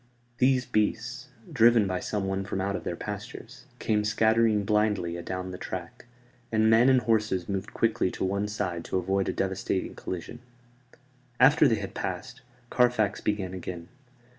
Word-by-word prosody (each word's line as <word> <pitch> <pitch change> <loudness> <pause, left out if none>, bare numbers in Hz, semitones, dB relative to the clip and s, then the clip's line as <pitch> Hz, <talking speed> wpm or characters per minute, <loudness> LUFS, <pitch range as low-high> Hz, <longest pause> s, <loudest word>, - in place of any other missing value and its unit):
These 130 0 +3
beasts, 120 +3 -1 0.3
driven 115 -4 +5
by 95 -1 -1
someone 95 -1 -2
from 95 0 -4
out 100 +1 -1
of - - -5
their - - -3
pastures, - - -8
came 105 -1 0
scattering 110 0 +2
blindly 105 -5 +1
adown 90 +1 -5
the 90 - -8
track; 90 +4 -7 0.5
and 110 0 +3
men 115 +4 +6
and 130 -1 +5
horses 105 -6 0
moved 100 +1 -4
quickly 115 -5 +1
to - - -3
one 100 +2 -1
side 95 -5 -3
to - - -1
avoid 95 +1 0
a - - +1
devastating 95 0 -2
collision. 95 +6 -6 1.0
After 145 +4 +6
they 115 - +3
had - - -6
passed, - - -5 0.3
Carfax 120 -5 +2
began 100 -3 -2
again. 90 -1 -7
105 Hz, 155 wpm, -27 LUFS, 95-115 Hz, 1.0 s, men